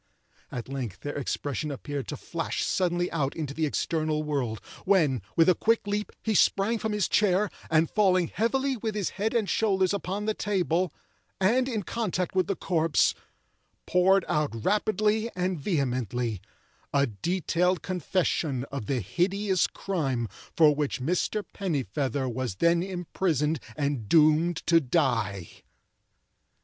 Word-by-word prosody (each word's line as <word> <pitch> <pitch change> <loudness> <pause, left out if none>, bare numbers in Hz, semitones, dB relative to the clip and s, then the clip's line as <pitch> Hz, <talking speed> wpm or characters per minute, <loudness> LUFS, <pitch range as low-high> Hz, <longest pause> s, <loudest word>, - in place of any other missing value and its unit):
At 120 - -5
length 125 -9 -5
their 145 - -5
expression 145 +1 -2
appeared 145 0 -5
to 150 - -5
flash 165 +4 -3
suddenly 175 -1 0
out 140 -4 -1
into 150 -4 -4
the 155 +1 0
external 155 0 -1
world, 135 -8 -2 0.2
when, 160 - +3
with 165 - +5
a 185 - +7
quick 225 +6 +1
leap, 205 +1 -2
he 220 - 0
sprang 205 +3 +3
from 220 - -2
his 210 -3 +1
chair, 200 0 +2 0.2
and 160 0 +3
falling 185 -4 +2
heavily 265 +4 0
with 220 -2 -3
his 205 -4 -1
head 220 +4 -2
and 220 -4 +2
shoulders 190 -4 +2
upon 200 +1 -3
the 215 - +1
table, 185 -5 0 0.5
and 245 +7 +3
in 220 -5 -2
contact 185 -4 -2
with 185 -1 +2
the 195 - 0
corpse, 165 -4 +2 0.7
poured 185 +1 +4
out 145 -8 -1
rapidly 215 +2 +1
and 180 -1 -1
vehemently 125 - -1 0.5
a 140 0 +3
detailed 175 - 0
confession 170 -6 -1
of 140 -7 -5
the 130 -3 0
hideous 190 - +1
crime 135 -11 -2 0.3
for 155 -3 +7
which 145 -1 -2
Mr. 180 +9 0
Pennifeather 140 - -1
was 125 -4 -3
then 170 - +3
imprisoned 175 -4 -1 0.2
and 140 -8 -2
doomed 160 +1 +4
to 165 -1 +5
die. 115 - 0
170 Hz, 140 wpm, -27 LUFS, 140-195 Hz, 0.7 s, a